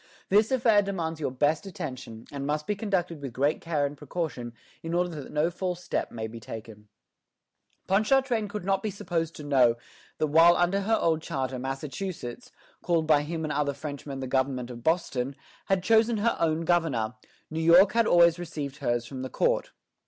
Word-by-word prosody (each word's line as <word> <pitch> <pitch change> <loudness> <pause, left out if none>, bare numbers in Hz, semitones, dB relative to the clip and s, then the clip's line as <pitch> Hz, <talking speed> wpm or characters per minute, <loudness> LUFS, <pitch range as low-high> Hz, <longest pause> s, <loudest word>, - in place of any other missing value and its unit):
This 210 +4 +4
affair 230 -5 +4
demands 170 -5 -3
your 150 - -1
best 150 +8 0
attention, 130 -10 -7
and 140 -1 -4
must 150 +1 -1
be 210 - -1
conducted 190 -7 -2
with 135 -4 -6
great 140 +5 +1
care 155 -4 0
and 140 +1 -4
precaution, 145 -5 -4 0.3
in 165 +1 -3
order 180 0 +1
that 150 -5 -8
no 155 +3 +1
false 180 0 -3
step - - -2
may 110 -1 -4
be 115 +1 -7
taken." 110 -1 -9 1.0
Ponchartrain 220 +3 +2
could 205 -2 -6
not 195 0 +1
be 215 - -2
supposed 170 -4 -3
to 150 - -8
know 130 -5 +4 0.4
that - - +1
while 165 +3 +6
under 175 +3 +2
her 220 +3 +2
old 160 -1 +1
charter 130 -3 -3
Massachusetts, 135 - -5 0.3
called 165 -2 +1
by 150 -2 +4
him 160 +2 -4
and 155 -1 -2
other 145 -1 0
Frenchmen 140 -1 -6
the - - -3
government 130 -1 -1
of 120 -1 -9
Boston, 140 -6 0 0.3
had 195 -2 +1
chosen 225 +2 +4
her 225 +3 +1
own 160 -1 +1
governor, 160 -10 +1 0.4
New 160 +1 -2
York 175 +4 +7
had 230 -1 +2
always 170 0 +5
received 150 -5 -5
hers 120 -5 -1
from 130 +1 -7
the 130 - -4
court. - - +1
160 Hz, 185 wpm, -27 LUFS, 135-180 Hz, 1.0 s, York